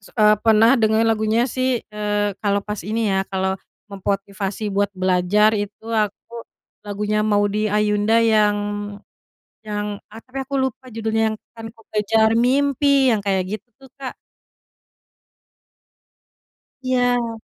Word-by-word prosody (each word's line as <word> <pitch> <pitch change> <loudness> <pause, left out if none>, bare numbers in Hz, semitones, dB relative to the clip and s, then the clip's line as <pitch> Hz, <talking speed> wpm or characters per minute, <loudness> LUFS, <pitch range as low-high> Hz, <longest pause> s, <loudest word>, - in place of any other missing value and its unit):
se 200 - -17
eee, 215 -1 +5
pernah 225 0 +5
dengerin 220 0 +3
lagunya 220 +1 +2
sih, 255 -1 -1
eee, 205 -1 -1
kalau 200 -1 +1
pas 210 -1 -4
ini 215 +2 -1
ya, 190 0 0
kalau 190 0 -1 0.4
memotivasi 200 +1 -3
buat 200 +1 +1
belajar 185 +3 +3
itu 205 0 -4
aku 215 0 -2 0.5
lagunya 210 +1 -1
Maudy 210 0 +1
Ayunda, 210 +1 +2
yang 215 -2 +3 1.1
yang 210 -1 -3 0.2
ah, 225 - -10
tapi 265 +2 -6
aku 275 +1 -7
lupa 260 0 -3
judulnya 220 0 0
yang, 220 - -5 0.2
"Akan 225 0 -8
ku 225 - -20
kejar 220 +1 +3
mimpi” 275 +2 +3
yang 220 - +1
kayak 195 +1 -1
gitu, 240 +5 -20
Kak. 260 -2 -6 2.7
Iya. 245 -3 0
215 Hz, 125 wpm, -21 LUFS, 205-230 Hz, 2.7 s, eee